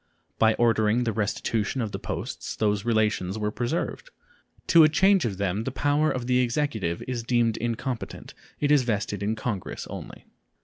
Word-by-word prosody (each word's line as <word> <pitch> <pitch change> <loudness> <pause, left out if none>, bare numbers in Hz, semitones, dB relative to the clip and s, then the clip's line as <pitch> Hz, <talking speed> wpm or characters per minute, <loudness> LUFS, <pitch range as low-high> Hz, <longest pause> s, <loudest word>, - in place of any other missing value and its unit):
By 110 0 +4
ordering 115 0 +2
the 115 - 0
restitution 110 +3 -1
of 110 -4 -2
the - - -4
posts - - -5
those 105 -2 0
relations 110 -4 +1
were 105 -1 -1
preserved. 125 - -3 0.6
To 170 -2 +7
a 155 - +6
change 190 +3 +4
of 100 -5 -2
them 100 +2 -1
the 135 - -2
power 145 +3 +1
of 125 -2 -2
the 125 0 +2
Executive 120 - -1
is 125 -2 -2
deemed 115 -1 +1
incompetent; 120 +1 -4 0.3
it 145 0 +1
is 145 -2 +6
vested 105 -4 -2
in 105 +2 0
Congress 110 -4 -4
only. - - -9
115 Hz, 170 wpm, -26 LUFS, 105-130 Hz, 0.6 s, To